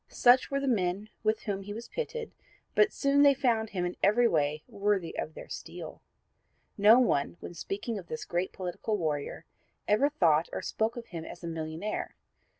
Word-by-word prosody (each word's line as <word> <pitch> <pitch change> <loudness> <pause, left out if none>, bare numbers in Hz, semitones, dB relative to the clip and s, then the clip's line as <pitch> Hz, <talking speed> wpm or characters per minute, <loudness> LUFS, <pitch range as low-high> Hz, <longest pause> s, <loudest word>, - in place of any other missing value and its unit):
Such 245 +1 +5
were 275 - 0
the 275 - -2
men 200 -3 0
with 215 0 +1
whom 195 -2 -2
he 205 +1 -7
was 235 +1 -7
pitted, 470 -1 -4 0.4
but 420 - +5
they - - -25
soon 280 -4 +4
found 230 -4 +1
him 180 -3 -2
in 175 - -3
every 235 +5 +5
way 150 -4 0
worthy 200 -4 -1
of 155 - -4
their - - -9
steel. - - -8 0.7
No 215 +3 +7
one, 175 - +2
when - - -8
speaking 200 +6 -4
of 175 - -12
this 155 - -5
great 175 +2 -1
political 185 +4 -3
warrior 150 -5 -3 0.4
ever 215 +8 +4
thought 165 - +3
or - - -4
spoke 220 +4 -1
of 235 - -6
him 165 -2 -6
as 175 - -10
a - - -4
millionaire. 165 +5 -4
205 Hz, 185 wpm, -30 LUFS, 175-240 Hz, 0.7 s, No